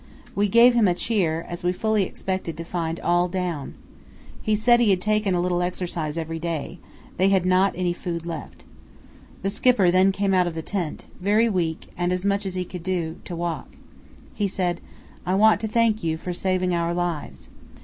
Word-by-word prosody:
We 205 Hz, +1 st, +2 dB
gave 235 Hz, +4 st, +6 dB
him 230 Hz, -4 st, +4 dB
a 175 Hz, -, +2 dB
cheer, 170 Hz, -7 st, 0 dB
as 175 Hz, 0 st, -6 dB
we 175 Hz, -, +2 dB
fully 215 Hz, +3 st, +1 dB
expected 185 Hz, -3 st, -3 dB
to 165 Hz, -, -5 dB
find 165 Hz, -1 st, -3 dB
all 175 Hz, +1 st, +2 dB
down. 175 Hz, -6 st, -3 dB, 0.7 s
He 215 Hz, -, +1 dB
said 240 Hz, +3 st, +4 dB
he 235 Hz, -3 st, +3 dB
had 190 Hz, -2 st, +3 dB
taken 210 Hz, -1 st, +1 dB
a -, -, +1 dB
little 175 Hz, 0 st, 0 dB
exercise 175 Hz, -3 st, -3 dB
every 165 Hz, 0 st, -3 dB
day; 165 Hz, 0 st, -4 dB, 0.4 s
they 190 Hz, +2 st, +4 dB
had 190 Hz, -2 st, +2 dB
not 185 Hz, +1 st, +3 dB
any 180 Hz, -1 st, 0 dB
food 170 Hz, -2 st, -5 dB
left. 165 Hz, -3 st, -7 dB, 0.8 s
The 195 Hz, -, 0 dB
Skipper 210 Hz, -4 st, +3 dB
then 185 Hz, +2 st, +4 dB
came 195 Hz, 0 st, 0 dB
out 180 Hz, -1 st, +3 dB
of 170 Hz, -, -4 dB
the 160 Hz, -, -4 dB
tent, 180 Hz, -6 st, -4 dB
very 210 Hz, +5 st, +3 dB
weak 170 Hz, -5 st, -2 dB
and 175 Hz, 0 st, -1 dB
as 180 Hz, +1 st, -1 dB
much 200 Hz, 0 st, +1 dB
as 185 Hz, -, -4 dB
he 180 Hz, 0 st, -2 dB
could 180 Hz, 0 st, -8 dB
do 170 Hz, -3 st, -2 dB
to 175 Hz, -, -5 dB
walk. 170 Hz, -1 st, -4 dB, 0.6 s
He 205 Hz, -, 0 dB
said, 180 Hz, -2 st, -1 dB, 0.4 s
'I 185 Hz, -, 0 dB
want 215 Hz, +1 st, +5 dB
to 220 Hz, -, -1 dB
thank 220 Hz, -2 st, +2 dB
you 160 Hz, -1 st, 0 dB
for 180 Hz, +2 st, -5 dB
saving 185 Hz, 0 st, 0 dB
our 170 Hz, 0 st, 0 dB
lives. 175 Hz, -3 st, -4 dB
180 Hz, 200 wpm, -24 LUFS, 170-200 Hz, 0.8 s, gave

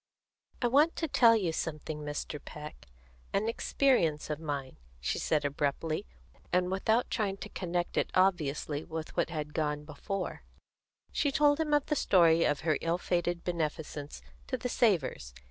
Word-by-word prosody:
"I -, -, +5 dB
want 290 Hz, +7 st, +4 dB
to 325 Hz, -, -1 dB
tell 235 Hz, -5 st, +6 dB
you 185 Hz, -7 st, 0 dB
something, 155 Hz, -1 st, -4 dB
Mr. 150 Hz, 0 st, -5 dB
Peck 150 Hz, 0 st, -9 dB, 0.5 s
an 205 Hz, +3 st, +1 dB
experience 225 Hz, -, +1 dB
of 150 Hz, -, -3 dB
mine," 140 Hz, -4 st, -4 dB, 0.2 s
she 60 Hz, -, -1 dB
said 150 Hz, -2 st, +1 dB
abruptly, 150 Hz, +5 st, -1 dB, 0.4 s
and 180 Hz, 0 st, +2 dB
without 220 Hz, +5 st, +1 dB
trying 200 Hz, -4 st, 0 dB
to -, -, -8 dB
connect 175 Hz, -1 st, -2 dB
it -, -, +2 dB
obviously 155 Hz, -5 st, +1 dB
with 160 Hz, -1 st, -6 dB
what -, -, +1 dB
had 150 Hz, -3 st, -4 dB
gone 150 Hz, -2 st, -1 dB
before, 180 Hz, +6 st, -4 dB, 0.7 s
she 285 Hz, -, +1 dB
told 290 Hz, +1 st, +4 dB
him 320 Hz, -1 st, 0 dB
the 295 Hz, +1 st, +2 dB
story 170 Hz, -, +5 dB
of 145 Hz, 0 st, +1 dB
her 155 Hz, -2 st, +1 dB
ill 165 Hz, +1 st, +1 dB
fated 175 Hz, -1 st, -1 dB
beneficence 155 Hz, -3 st, -3 dB, 0.2 s
to 255 Hz, -, -1 dB
the 250 Hz, +1 st, -3 dB
Savors. 150 Hz, -, +1 dB
170 Hz, 155 wpm, -31 LUFS, 150-210 Hz, 0.7 s, tell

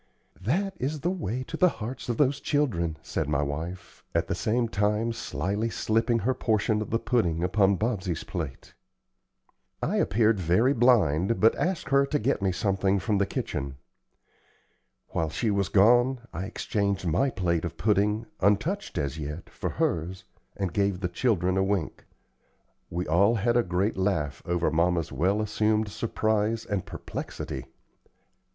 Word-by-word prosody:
"That 185 Hz, -, 0 dB
is 145 Hz, +3 st, -2 dB
the 175 Hz, -, 0 dB
way 130 Hz, -, -3 dB
to -, -, -7 dB
the 180 Hz, -, +5 dB
hearts 120 Hz, -1 st, -6 dB
of 120 Hz, -, -1 dB
those 140 Hz, -1 st, +2 dB
children," 100 Hz, -, 0 dB
said -, -, -2 dB
my 75 Hz, -1 st, +1 dB
wife, 80 Hz, +6 st, -6 dB
at -, -, +1 dB
the -, -, -1 dB
same 115 Hz, +2 st, 0 dB
time 105 Hz, +2 st, 0 dB
slyly 100 Hz, +5 st, -2 dB
slipping 115 Hz, +2 st, +1 dB
her 120 Hz, +4 st, +1 dB
portion 110 Hz, -3 st, +1 dB
of 110 Hz, -, -4 dB
the 115 Hz, -, +2 dB
pudding 90 Hz, -10 st, 0 dB
upon 95 Hz, +1 st, +3 dB
Bobsey's 100 Hz, -7 st, -2 dB
plate. 80 Hz, -7 st, -6 dB, 1.1 s
I -, -, -1 dB
appeared 110 Hz, 0 st, +2 dB
very 95 Hz, -, +3 dB
blind, 110 Hz, -, +3 dB
but 110 Hz, -, +5 dB
asked 180 Hz, -2 st, -2 dB
her 140 Hz, 0 st, +4 dB
to 150 Hz, -, +1 dB
get 120 Hz, -2 st, 0 dB
me 95 Hz, -1 st, +2 dB
something 95 Hz, +1 st, +1 dB
from 100 Hz, +1 st, 0 dB
the 100 Hz, -, +2 dB
kitchen. 70 Hz, 0 st, -3 dB, 1.3 s
While 80 Hz, -1 st, -1 dB
she 110 Hz, +8 st, -1 dB
was 100 Hz, -3 st, 0 dB
gone, 120 Hz, +5 st, +4 dB
I 90 Hz, +4 st, -3 dB
exchanged 100 Hz, -2 st, -1 dB
my 90 Hz, -, +2 dB
plate 85 Hz, -7 st, 0 dB
of 85 Hz, -1 st, -5 dB
pudding, 105 Hz, +1 st, +1 dB
untouched 125 Hz, -, +1 dB
as 70 Hz, +2 st, -2 dB
yet, 75 Hz, +3 st, -6 dB
for -, -, -4 dB
hers, 90 Hz, +3 st, -1 dB, 0.3 s
and 95 Hz, -4 st, -2 dB
gave 100 Hz, -2 st, +1 dB
the 90 Hz, -, -1 dB
children 95 Hz, -2 st, +1 dB
a 95 Hz, -, +3 dB
wink. 95 Hz, -4 st, -2 dB, 0.8 s
We 90 Hz, +2 st, -2 dB
all 100 Hz, +8 st, +3 dB
had 120 Hz, +2 st, +1 dB
a 120 Hz, -, +5 dB
great 95 Hz, +1 st, -1 dB
laugh 85 Hz, -8 st, -1 dB
over 85 Hz, -1 st, +1 dB
mamma's 85 Hz, 0 st, +1 dB
well 100 Hz, +6 st, +1 dB
assumed 110 Hz, 0 st, +1 dB
surprise 110 Hz, +1 st, 0 dB
and 100 Hz, -5 st, -3 dB
perplexity. 65 Hz, -2 st, -6 dB
100 Hz, 160 wpm, -27 LUFS, 90-115 Hz, 1.3 s, the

